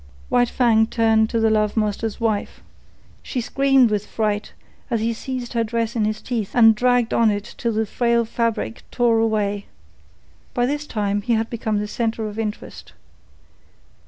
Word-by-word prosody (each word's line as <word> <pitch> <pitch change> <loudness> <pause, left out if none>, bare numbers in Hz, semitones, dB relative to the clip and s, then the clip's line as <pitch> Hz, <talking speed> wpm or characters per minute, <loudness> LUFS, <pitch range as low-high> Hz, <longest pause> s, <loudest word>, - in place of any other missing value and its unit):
White 245 -1 +3
Fang 225 -3 +3
turned 220 -1 +2
to 230 - 0
the 220 0 +3
love 215 0 +1
master's 215 0 -1
wife. 220 -3 -2 0.6
She 255 - -4
screamed 270 0 +3
with 210 -1 -1
fright 210 -1 -2 0.4
as 235 -3 0
he 230 +1 0
seized 250 +1 -5
her 230 -1 +1
dress 230 +1 -2
in 220 -2 +1
his 215 0 -3
teeth 225 -5 -3
and 225 -2 +7
dragged 245 +1 +1
on 230 -1 +4
it 205 0 -3
till 235 -1 -1
the 220 +1 0
frail 235 +2 +1
fabric 225 - -2
tore 235 -2 +2
away. 205 -3 0 0.9
By 245 - +2
this 295 +3 -2
time 205 -2 -1
he 235 +3 0
had 225 0 0
become 220 -2 -1
the 210 0 -2
centre 225 -1 -2
of 210 +1 -7
interest. 215 -1 -6
225 Hz, 170 wpm, -21 LUFS, 215-235 Hz, 0.9 s, and